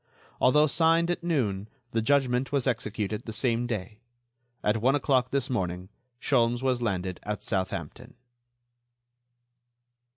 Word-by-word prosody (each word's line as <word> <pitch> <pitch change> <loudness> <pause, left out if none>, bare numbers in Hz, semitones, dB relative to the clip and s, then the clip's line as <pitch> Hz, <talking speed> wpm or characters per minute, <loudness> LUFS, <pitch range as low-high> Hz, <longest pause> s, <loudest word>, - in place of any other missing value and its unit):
Although 150 +4 +5
signed 165 +3 +3
at 175 - -3
noon, 110 - -1 0.2
the 115 - +1
judgment 130 0 +2
was 140 -3 +1
executed 110 -4 -2
the - - -3
same 120 +2 0
day. 105 -2 -5 0.6
At 105 +2 +2
one 130 +4 +3
o'clock 130 -3 +2
this 140 0 0
morning 90 -7 -3 0.3
Sholmes 120 -2 +1
was 130 -2 +1
landed 95 -5 -2
at 105 0 -4
Southampton." 95 -3 -4
120 Hz, 125 wpm, -27 LUFS, 105-135 Hz, 0.6 s, Although